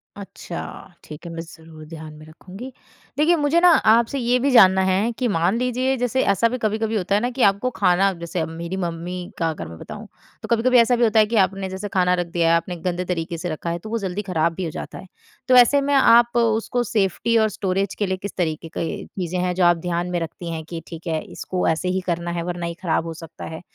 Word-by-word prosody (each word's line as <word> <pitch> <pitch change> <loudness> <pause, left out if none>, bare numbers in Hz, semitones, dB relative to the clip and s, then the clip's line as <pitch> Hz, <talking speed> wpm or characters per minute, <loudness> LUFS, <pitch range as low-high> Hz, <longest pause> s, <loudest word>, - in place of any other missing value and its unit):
अच्छा, 195 -3 -8 0.4
ठीक 155 +3 -11
है, 170 - -6
मैं 165 0 -5
ज़रूर 160 -1 -13
ध्यान 155 -1 -9
में 155 0 -13
रखूँगी। 190 +10 -11 0.5
देखिए 325 +4 +4
मुझे 300 +2 +2
ना 360 - +7
आपसे 235 -3 +4
ये 245 +1 +2
भी 275 +2 +1
जानना 190 -5 +6
है 190 +5 +1
कि 250 - +1
मान 180 +2 +1
लीजिए 250 +2 0
जैसे 250 +2 0
ऐसा 230 +4 +2
भी 255 - -3
कभी-कभी 220 0 -1
होता 195 +1 0
है 210 - +2
ना 245 - 0
कि 255 +1 -4
आपको 200 +6 -2
खाना, 190 -1 +2
अब 180 -3 -7
जैसे 170 -1 -3
मेरी 170 +3 -6
मम्मी 175 +2 -5
का 165 -1 0
अगर 120 - -5
मैं 80 0 -10
बताऊँ, - - -9 0.3
तो - - -7
कभी-कभी 240 +2 +3
ऐसा 240 +1 +5
भी 240 - +1
होता 220 -1 +4
है 215 - +6
कि 230 +2 -3
आपने 195 0 -6
जैसे 190 +2 -5
खाना 180 -1 +3
रख 175 -1 -1
दिया 170 -2 +2
है, 165 - +5
आपने 175 +2 -4
गंदे 180 +1 -3
तरीके 170 -1 -3
से 175 +2 -4
रखा 160 +2 -4
है, 170 +1 -2
तो 215 - -9
वो 230 - -1
जल्दी 195 +1 -3
ख़राब 170 -4 0
भी 185 - -5
हो - - -3
जाता - - -7
है। 190 - -11 0.4
तो 255 - +5
ऐसे 250 +3 +6
में 285 +1 0
आप 240 -3 +5
उसको 230 +1 +1
सेफ़्टी 225 +1 0
और 220 -1 +3
स्टोरेज 195 -1 -2
के 205 - +1
लिए 190 0 -2
किस 200 +1 -7
तरीके 165 -2 -2
के 165 - -3
चीजें 180 -1 -4
हैं, 180 0 0
जो 185 - +1
आप 175 -1 +5
ध्यान 175 +1 -2
में 175 - 0
रखती 165 +1 -6
हैं 160 -1 -5
कि 165 -1 -5
ठीक 165 +1 -9
है 160 -1 -1
इसको 185 -1 -3
ऐसे 165 +3 0
ही - - -1
करना 170 0 -2
है, 170 -1 -3
वरना 175 -1 -4
ये 170 - -3
खराब 165 -2 0
हो 165 - -5
सकता 165 0 -10
है। - - -9
185 Hz, 250 wpm, -22 LUFS, 170-225 Hz, 0.5 s, ना